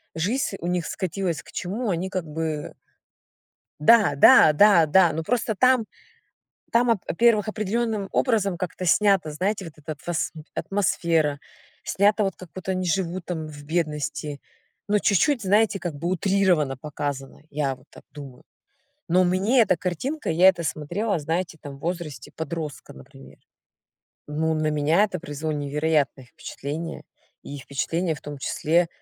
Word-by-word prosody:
жизнь 200 +5 -1
у 170 - -5
них 175 -2 -1
скатилась 180 -5 -3
к - - -17
чему 210 +5 -3
они 180 +2 -2
как 185 -2 -3
бы. 155 -1 -4 1.1
Да, 205 -2 +5
да, 150 +2 +7
да, 185 0 +6
да. 170 +2 +4
Ну 160 +1 -3
просто 230 +3 -1
там 255 +1 +3 0.9
там, 240 +1 +3
во-первых, 220 0 +2
определённым 215 0 -2
образом 210 -7 +1
как-то 180 +1 -4
снято, 195 -2 +3
знаете, 190 +5 -2
вот 165 - -9
эта 155 +1 -8
атм 160 +3 -4 0.4
атмосфера 165 -7 0 0.4
снята, 205 +2 +2
вот 195 - -1
как 185 - -11
будто 185 0 -4
они 185 0 -2
живут 175 0 -1
там 160 -3 -4
в 145 -1 -11
бедности. 150 -2 -2 0.5
Но 210 0 +2
чуть-чуть, 235 - +2
знаете, 205 +1 +2
как 170 -3 -4
бы 150 +4 -4
утрированно 180 -6 +1
показано. 140 -1 -5
Я 140 -2 -1
вот 130 +2 -23
так - - -15
думаю. 140 -4 -11 0.7
Но 180 +2 +4
мне 190 +8 +3
эта 190 -5 +3
картинка, 250 - -3
я 175 +4 +6
это 175 -3 +2
смотрела, 175 +7 -2
знаете, 165 +2 -3
там, 140 -1 -9
в - - -18
возрасте 170 -4 -5
подростка, 160 -2 -6
например. 65 +1 -15 0.9
Ну, 160 +2 -1
на 155 0 0
меня 155 +5 +2
это 200 -4 -2
произвело 150 +1 -4
невероятное 145 -1 0
впечатление. 150 +6 -7 0.4
И 145 - -7
впечатление, 160 +5 -2
в 150 - -11
том 145 0 -7
числе, 165 +5 +1
170 Hz, 150 wpm, -24 LUFS, 150-195 Hz, 1.1 s, да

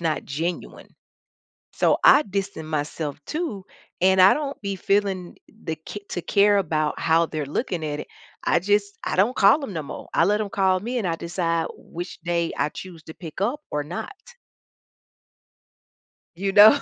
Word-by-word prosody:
not 160 -2 -1
genuine. 165 +5 -4 0.8
So, - - +2
I - - +8
distance 195 - -4
myself 150 -1 -3
too, 300 - -3 0.4
and 190 +1 +4
I 190 - +8
don't 290 -1 -4
be 200 -1 -3
feeling 195 -2 0
the 165 -7 -6
c 205 - -6
to 175 - -3
care 205 +2 +4
about 155 -5 -1
how 165 +1 +3
they're 155 -2 -4
looking 170 - -2
at 150 -1 -3
it, - - -8 0.4
I - - +3
just 205 +1 +1
I - - -2
don't 210 +7 +3
call 210 +10 +5
'em 210 - -6
no 160 -4 -3
more, - - -8
I 165 - +4
let 210 +3 +2
'em 210 - -2
call 190 -2 +2
me, 240 +5 -2
and 195 - -1
I 165 - -1
decide 170 -1 -1
which 175 +2 -8
day 170 -1 -1
I - - +1
choose 170 -1 -10
to 160 - -10
pick 165 +1 -9
up 250 +9 0
or 150 0 -1
not. 220 - -6 2.2
You 195 +2 -1
know? 215 +7 +9
185 Hz, 175 wpm, -24 LUFS, 165-205 Hz, 2.2 s, know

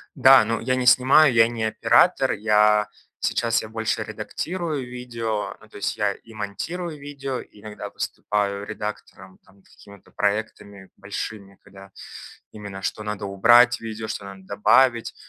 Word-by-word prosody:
Да, 130 -3 +7
ну, 115 +1 -1
я 130 +2 -1
не 130 -1 -2
снимаю, 130 +3 +6
я 115 -1 +5
не 115 -1 -4
оператор, 110 - +3
я, 105 0 +3 0.3
сейчас 115 -1 0
я 110 - -9
больше 110 0 -2
редактирую 160 -6 -4
видео, 115 -5 -4
ну 110 - -18
то - - -13
есть 105 - -3
я 105 -2 0
и 115 +3 -17
монтирую 150 - -5
видео, 140 -2 -5
иногда 105 0 -10
выступаю 100 -1 -3
редактором, 105 -3 -8
там, 100 0 -24
какими-то 100 -2 -18
проектами 100 -2 -3
большими, 100 -1 -7
когда 95 -1 -15 0.6
именно 100 -2 -9
что - - -3
надо 105 -1 -5
убрать 120 +5 +5
в - - -23
видео, 110 -1 -6
что 105 - -5
надо 95 -1 -11
добавить. 115 +4 +2
110 Hz, 150 wpm, -23 LUFS, 100-125 Hz, 0.6 s, Да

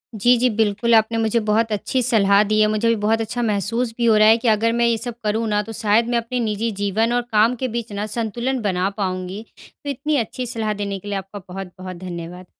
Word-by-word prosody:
जी, 240 +4 +4
जी। 250 +1 +2
बिल्कुल, 220 +1 +1
आपने 220 +1 +2
मुझे 225 +1 +1
बहुत 220 +1 +2
अच्छी 215 +5 -1
सलाह 205 -4 +4
दी 215 - +3
है। 215 - +5
मुझे 215 +2 0
भी 230 - +3
बहुत 225 +1 +2
अच्छा 225 +2 -3
महसूस 225 +2 0
भी 240 - 0
हो 225 -2 +5
रहा 215 0 +6
है 225 +1 +6
कि 235 - -3
अगर 225 +1 +3
मैं 235 0 +2
ये 230 - +2
सब 240 +1 -5
करूँ 220 +2 0
ना 210 0 +1
तो 225 - -9
शायद 220 +2 +3
मैं 240 - +1
अपने 235 +2 -2
निज़ी 225 0 -1
जीवन 220 +4 +1
और 245 - +2
काम 220 +3 +3
के 255 +2 -3
बीच 235 -2 -4
ना 205 +1 -3
संतुलन 235 +3 -2
बना 190 -2 0
पाऊँगी। 185 +1 -4 0.4
तो 285 - -5
इतनी 285 +2 -1
अच्छी 250 +1 -3
सलाह 225 -3 -2
देने 200 -1 -4
के 205 - -12
लिए 200 -1 -2
आपका 195 +1 -7
बहुत-बहुत 185 0 -8
धन्यवाद। 175 0 -8
220 Hz, 240 wpm, -21 LUFS, 205-235 Hz, 0.4 s, रहा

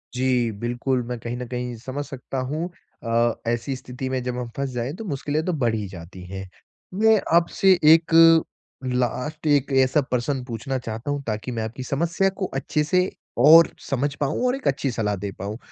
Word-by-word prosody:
जी, 125 -2 +1
बिल्कुल, 120 +2 -1
मैं 120 0 -5
कहीं 120 +2 -5
न 125 - -5
कहीं 125 0 -4
समझ 130 +5 -5
सकता 135 0 -7
हूँ 160 +4 -2 0.3
अ, 115 0 +2
ऐसी 120 +3 -1
स्थिति 130 +1 -6
में 130 -1 -1
जब 125 0 -3
हम 120 -1 -4
फँस 140 0 -1
जाएँ 125 +4 -3
तो 220 +3 -7
मुश्किलें 150 0 -2
तो 180 - 0
बढ़ 120 -7 +1
ही 105 -2 -3
जाती 90 0 -10
हैं। 95 +1 -6 0.6
मैं 220 -1 +6 0.2
आपसे 175 +3 +4 0.2
1 165 0 +2 0.8
लास्ट 125 +6 -2
एक 145 -2 +2
ऐसा 130 +3 +2
प्रश्न 130 0 -2
पूछना 125 +2 -3
चाहता 115 +2 -5
हूँ 145 - -2
ताकि 110 +3 -3
मैं 115 -2 -2
आपकी 115 +4 -6
समस्या 170 +8 +1
को - - +2
अच्छे 150 +3 -1
से 180 +4 +2 0.4
और 165 +2 +9 0.2
समझ 140 +1 0
पाऊँ 150 - -1
और 250 - +1
एक 270 - -5
अच्छी 135 0 0
सलाह 105 -3 -1
दे 100 +1 -5
पाऊँ। 100 +3 -4
130 Hz, 190 wpm, -23 LUFS, 120-145 Hz, 0.8 s, और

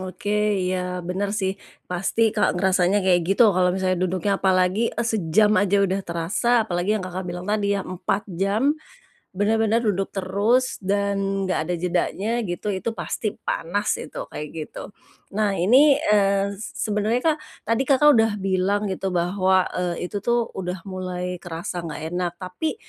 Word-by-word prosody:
Oke, 205 +3 -1
iya, 180 -1 -2
benar 200 +3 -2
sih 190 0 0 0.3
pasti 200 +5 0
Kak 210 -4 +1
ngerasanya 190 +1 +2
kayak 180 -2 +4
gitu 205 +1 +5
kalau 180 0 +3
misalnya 185 -1 0
duduknya 185 +2 0
apalagi 190 +4 +2 0.2
sejam 210 -1 +2
aja 200 0 +2
udah 190 +1 0
terasa 195 +7 +1
apalagi 185 +2 0
yang 185 - -4
Kakak 185 0 -5
bilang 175 +1 -5
tadi 205 -1 0
ya 195 - -3
4 185 +3 -2 0.2
jam, 215 +9 +2 0.6
benar-benar 220 +3 +2
duduk 195 -1 0
terus 205 +7 +1
dan 200 +1 0 0.3
enggak 185 -4 0
ada 175 +2 -2
jedanya 180 +4 -1
gitu 175 +2 -4
itu 205 +4 -2
pasti 220 -1 -4
panas 205 +5 -1
gitu - - -7
kayak 150 - -6
gitu. 160 +4 -7 0.4
Nah, 205 -1 0
ini, 265 - +5 0.2
eee, 200 -1 +2
sebenarnya 215 +2 -1
Kak 305 - -3 0.3
tadi 230 +3 +1
Kakak 295 +2 +6
sudah 225 -4 +4
bilang 195 +1 0
gitu 190 -1 -3
bahwa, 185 +1 +2
eee, 180 0 -3
itu 205 - -2
tuh 235 +2 0
udah 180 -2 -5
mulai 180 -1 -4
kerasa 175 +1 -5
enggak 160 +1 -6
enak 175 -1 -1
tapi, 185 - -4
195 Hz, 155 wpm, -23 LUFS, 180-210 Hz, 0.6 s, Kakak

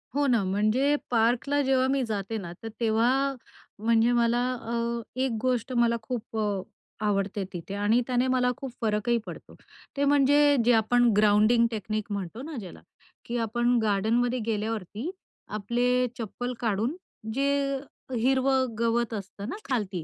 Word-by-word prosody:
हो 290 0 +2
ना. 235 -5 +3
म्हणजे 215 +9 +2 0.2
पार्कला 240 +5 +2
जेव्हा 260 -1 +2
मी 270 -1 +1
जाते 215 0 -3
ना, 175 -4 -6
तर - - -4
तेव्हा 245 +5 +2 0.5
म्हणजे 230 +2 +3
मला 235 0 +2 0.2
अ, 235 0 -2 0.2
एक 265 -2 +1
गोष्ट 255 -1 0
मला 235 -1 +3
खूप 225 -1 -5
अ, 205 -3 0 0.4
आवडते 200 0 0
तिथे 175 +3 -6
आणि 210 +4 +2
त्याने 250 0 +1
मला 250 -1 +2
खूप 270 -2 -6
फरकही 220 +2 +1
पडतो. - - -10 0.4
ते 285 - +1
म्हणजे 285 +1 +5
जे 245 - +5
आपण 240 +2 +3
ग्राउंडिंग 215 +3 +5
टेक्निक 215 0 -3
म्हणतो 200 +4 -4
ना, 305 +1 -7
ज्याला, 185 -4 -10 0.4
की 240 +1 -3
आपण 240 +2 +1
गार्डनमध्ये 225 +4 +1
गेल्यावरती 220 - -3 0.4
आपले 245 +4 0
चप्पल 245 +2 -4
काढून 225 - 0 0.4
जे 275 0 +1 0.4
हिरवं 260 +2 +2
गवत 235 0 +1
असतं 200 +2 -6
ना - - -4
खालती, 200 -9 -1
235 Hz, 145 wpm, -27 LUFS, 215-255 Hz, 0.5 s, म्हणजे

